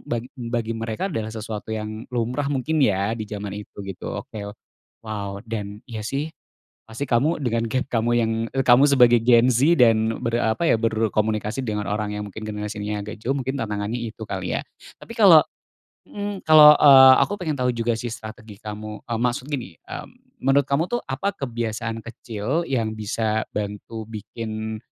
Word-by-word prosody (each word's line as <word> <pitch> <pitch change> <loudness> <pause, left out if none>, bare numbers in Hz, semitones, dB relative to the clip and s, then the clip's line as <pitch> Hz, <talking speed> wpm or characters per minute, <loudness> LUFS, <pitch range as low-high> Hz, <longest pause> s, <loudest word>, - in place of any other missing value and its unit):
bag 120 0 -2
bagi 120 -3 -3
mereka 115 - -3
adalah 110 -3 -3
sesuatu 110 -1 -6
yang 110 +1 -6
lumrah 125 +3 -2
mungkin 145 +3 0
ya 100 -3 +2
di 110 -2 -5
zaman 100 -1 -5
itu 105 +1 -9
gitu 95 -2 -6
oke 100 -2 -7
o - - -6 0.5
wow 100 -2 -5
dan 105 -2 -5
iya 115 -3 -5
sih, 145 +6 -2 0.6
pasti 115 +5 -4
kamu 135 +8 +2
dengan 115 -2 0
gap 130 +2 0
kamu 115 0 +1
yang, 115 -1 +1 0.2
eee, 135 - +2
kamu 125 +3 +7
sebagai 120 -3 +6
Gen 120 +1 +5
Z 140 +9 +4
dan 110 -1 +4
ber 115 0 0
apa 110 +9 0
ya - - +4
berkomunikasi 110 +1 0
dengan 105 -1 -2
orang 105 0 -2
yang 105 - -4
mungkin 110 - -9
generasinya 105 0 -4
agak 105 0 -8
jauh 135 +5 -1
mungkin 135 +1 -3
tantangannya 105 +2 -3
itu 115 -1 -7
kali 95 -3 -3
ya, - - -3 0.4
tapi - - -11
kalau - - +8 0.7
mhm, 205 -1 -5
kalau, 150 -1 +9
eee, 135 -2 +9
aku - - -3
pengen 155 -5 -2
tahu 125 0 +2
juga 115 0 0
sih 120 - -4
strategi 110 -2 -10
kamu, 105 0 -7
mmm, 115 -1 -2
maksud 125 +2 -1
gini, 125 -9 -4
mmm, - - -11
menurut 135 +1 +3
kamu 140 +3 +1
tuh 240 - +1
apa 145 +10 -2
kebiasaan 115 - -3
kecil 120 +7 -3
yang 115 -5 0
bisa 110 +1 -1
bantu 105 +2 -5
bikin, 110 0 -5
115 Hz, 175 wpm, -23 LUFS, 110-130 Hz, 0.7 s, kalau